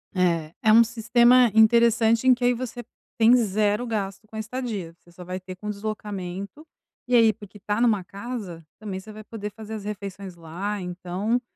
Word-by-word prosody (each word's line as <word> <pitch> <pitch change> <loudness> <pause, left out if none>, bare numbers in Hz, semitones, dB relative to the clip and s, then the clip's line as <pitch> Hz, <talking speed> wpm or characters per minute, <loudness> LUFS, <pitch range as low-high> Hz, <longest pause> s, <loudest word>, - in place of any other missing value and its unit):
É, 170 -3 +1
é 215 - +5
um 230 +1 +8
sistema 235 +1 +4
interessante 230 +1 +4
em 255 - +8
que 250 0 -4
aí 245 - +4
você 240 0 -6 0.4
tem 230 +2 +7
0 210 0 +1
gasto 210 -2 -4
com 220 - -14
a - - -3
estadia, 220 -7 -5
você 175 - -21
só 180 +1 -11
vai 180 +1 -5
ter 185 0 -9
com 210 +3 -9
o - - -2
deslocamento, 205 - -6 0.4
e 250 - +2
aí 225 -2 +6
porque 205 0 -13
tá 205 +3 -2
numa 215 -6 +3
casa 195 -5 -7
também 200 -3 -5
você 215 +3 -11
vai 215 0 -10
poder 210 -1 -7
fazer 220 +1 -9
as 215 -2 -6
refeições 200 -2 -7
lá, 175 +5 -5
então 180 +6 -2
210 Hz, 190 wpm, -24 LUFS, 190-230 Hz, 0.4 s, um